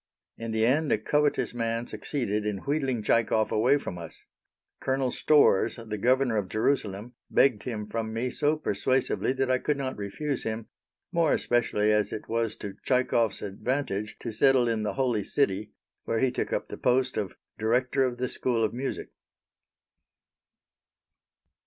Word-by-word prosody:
In 115 0 -6
the 110 0 +1
end 145 +5 +2
a - - +4
covetous 145 +7 +1
man 115 0 -1
succeeded 110 -2 -2
in 105 -2 -3
wheedling 135 -6 -1
Tchaikov 110 0 +2
away 125 +6 +4
from 90 -10 -6
us. 85 -2 -8 0.6
Colonel 130 -1 0
Storrs, 145 -10 +4
the 110 -3 -6
Governor 125 0 +2
of 100 -3 -2
Jerusalem, 110 -1 -1 0.2
begged 125 -6 +3
him 110 -4 -4
from 110 0 -3
me 120 +3 -2
so 150 +1 +1
persuasively 130 0 0
that 135 -1 0
I 130 - +3
could 150 +1 0
not 135 -1 -3
refuse 135 +8 -3
him, 110 0 -4 0.5
more 165 -3 +3
especially 110 -3 +1
as 105 -1 +2
it 105 - -6
was 115 -1 -1
to 100 - -7
Tchaikov's 120 -4 +1
advantage 105 0 -2
to 115 - -4
settle 125 +2 +4
in 115 -2 0
the 105 - -2
Holy 125 -6 0
City, 105 -4 0 0.4
where 115 - 0
he 130 0 +2
took - - -3
up - - -2
the - - -6
post 125 +1 +1
of 95 -4 -3 0.2
Director 125 +4 +2
of 125 -2 -1
the 125 +1 -1
School 120 -2 -1
of 110 - 0
Music. 130 +3 -4
120 Hz, 160 wpm, -27 LUFS, 105-130 Hz, 0.6 s, a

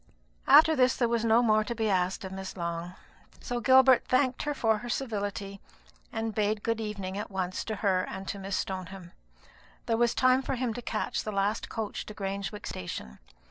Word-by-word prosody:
After 320 0 +7
this, 255 -2 +3
there 240 - +1
was 230 -1 0
no 230 +1 +4
more 215 -2 +4
to 235 +2 -4
be 225 -1 0
asked 185 -1 0
of 190 - -6
Miss 190 0 -7
Long; 170 +1 -4 0.4
so 245 -1 -3
Gilbert 260 +1 +6
thanked 255 0 +2
her 295 -1 -2
for 220 -4 +2
her 240 - -7
civility, 205 -5 -3 0.5
and 225 0 -3
bade 210 0 0
good 230 -1 -1
evening 200 -2 -4
at 210 - -5
once 185 -2 -3
to 220 - -3
her 185 -2 +3
and 190 0 -7
to 200 - -4
Miss 195 0 -3
Stoneham. 185 -1 -5 0.7
There 230 -1 +1
was 240 0 +2
time 255 0 +4
for 270 - -2
him 245 -2 -1
to 245 - -6
catch 220 -2 -2
the 215 - -4
last 200 +2 -1
coach 220 -2 -4
to 210 - -8
Grangewick 200 +1 -4
station. 65 -8 -6
215 Hz, 195 wpm, -29 LUFS, 195-235 Hz, 0.7 s, After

